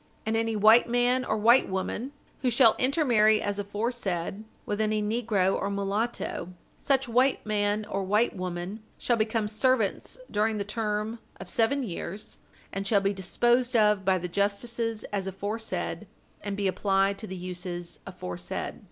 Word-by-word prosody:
And 220 0 0
any 225 0 0
white 220 +3 +6
man 245 +1 +2
or 215 - -1
white 235 +5 +5
woman 190 +7 -3 0.3
who 255 - +2
shall 235 -1 +6
intermarry 245 -6 +4
as 205 -1 -2
aforesaid 205 -2 -2 0.2
with 205 +1 -2
any 215 0 +1
negro 210 -3 +1
or 200 - -1
mulatto, 200 -2 -2 0.3
such 270 -1 +1
white 255 +3 +2
man 210 0 0
or 195 -1 -3
white 210 +5 +2
woman 180 +3 -5 0.2
shall 240 - +1
become 220 -1 0
servants 220 - 0
during 215 +1 +1
the 200 - -1
term 215 +1 -2 0.2
of - - -5
seven 265 +5 +1
years, 195 -1 -6 0.3
and 195 +1 -3
shall 200 -1 +3
be 195 +1 +1
disposed 240 +6 +1
of 210 -3 +4
by 190 0 +3
the 180 0 -4
justices 215 +4 -1
as 195 -2 -1
aforesaid, 205 +4 -3 0.3
and 200 -1 -4
be 200 -1 0
applied 195 +1 +1
to 220 - -6
the 190 - -6
uses 175 -1 -5
aforesaid." 90 - -5
210 Hz, 155 wpm, -27 LUFS, 195-230 Hz, 0.3 s, white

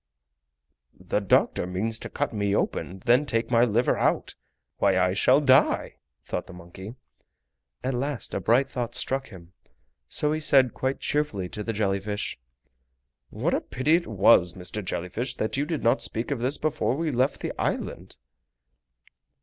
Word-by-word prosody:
"The 90 +2 -1
doctor 95 -2 +2
means 110 +5 -1
to - - -7
cut - - -2
me 100 -1 0
open - - -1
and 95 +1 -11
then 125 +7 +4
take 115 0 -1
my 115 -1 +5
liver 120 +1 +2
out! - - 0 0.4
Why 95 - +2
I 90 0 +2
shall 130 +7 +4
die!" 130 - +3 0.3
thought - - -4
the 95 - -11
monkey. 90 +5 -10 0.9
At 130 - -1
last 135 +1 -3
a - - -1
bright 120 +8 +3
thought 120 -3 -4
struck 135 0 0
him, 90 -4 -14 0.6
so 150 - +1
he 155 - -1
said 135 -5 +4
quite 130 +1 -2
cheerfully 110 -12 -1
to 105 - -6
the 115 - -2
jelly 100 -2 0
fish: 105 - -4 0.9
"What - - -1
a - - +1
pity 145 +6 +1
it 170 0 -1
was, 95 -4 +4
Mr. 90 +3 -4
Jelly 90 0 -4
Fish, 125 +6 -3
that 110 - -2
you 140 +2 0
did 155 -1 -3
not 115 - +3
speak 115 +5 -2
of 140 - -1
this 130 +4 0
before 155 -4 0
we 160 -1 -1
left 130 +2 0
the - - -3
island!" - - -3
115 Hz, 175 wpm, -26 LUFS, 95-135 Hz, 0.9 s, my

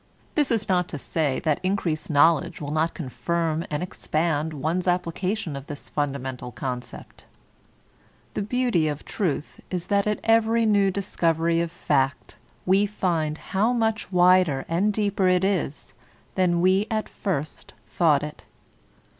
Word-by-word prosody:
This 295 -3 +2
is 225 -3 0
not 180 -2 +2
to 150 - -6
say 145 -1 -1
that 155 -3 +1
increased 185 -5 -1
knowledge 165 +3 +3
will 145 -1 -5
not 160 +1 0
confirm 165 +2 -2
and 150 +3 -2
expand 160 -3 -1
one's 160 +5 -2
application 180 0 -1
of 140 0 -8
this 145 -2 -8
fundamental 135 -4 -3
con 125 +1 -3
cept; - - -13 1.1
(the - - -2
beauty 215 -6 +1
of 150 -1 -4
truth 170 -7 -3
is 180 -2 -3
that 200 +1 +2
at 210 - 0
every 225 0 +3
new 205 -2 +4
dis 195 0 -4
covery 165 0 +2
of 170 -1 -2
fact 140 -5 -1 0.3
we 195 +3 +4
find 165 -7 -1 0.2
how 215 +6 +3
much 225 -4 -1
wider 180 -6 +4
and 185 +6 +1
deeper 200 -2 +1
it 180 0 +3
is 185 -7 -1 0.4
than 175 -2 +2
we 190 +3 +3
at 215 -1 -1
first 155 -7 -4
thought 150 -5 +2
it). 150 0 -8
175 Hz, 150 wpm, -25 LUFS, 155-195 Hz, 1.1 s, new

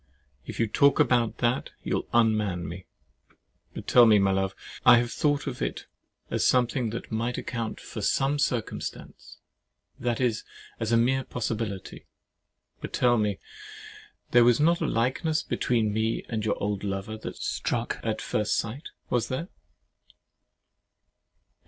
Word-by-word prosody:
If - - -7
you 115 - +3
talk 140 +6 +3
about 120 -3 +2
that, 120 +2 0
you'll - - -2
unman 105 -6 +2
me. 90 +1 -8 0.9
But - - -6
tell 120 -2 +7
me, 110 -1 +6
my 100 -1 +3
love,—I 95 +4 +2
have 120 0 0
thought 145 -1 0
of 130 -4 -5
it - - -3 0.5
as - - 0
something 125 -1 +2
that 115 - -6
might 115 +2 -1
account 115 -3 -4
for - - -7
some 140 +2 +1
circumstances; 125 -5 -4 0.6
that 120 -1 -1
is, 120 -4 0 0.4
as 115 0 -2
a 115 - +5
mere 130 +3 +2
possibility. 110 -6 -4 0.7
But - - -7
tell 120 -2 +3
me, 105 -2 0 0.9
there 120 0 +7
was 120 -1 +4
not 170 +3 +3
a - - +1
likeness 130 +7 0
between 110 -4 0
me 110 +1 -1
and 110 -2 -3
your 110 - +1
old 100 -1 -2
lover 100 +2 -3
that 110 - -7
struck - - -2
you - - -1
at - - -2
first 105 0 0
sight? 125 +8 -4 0.2
Was 120 -3 +1
there? 150 +8 -4
115 Hz, 145 wpm, -27 LUFS, 105-125 Hz, 0.9 s, tell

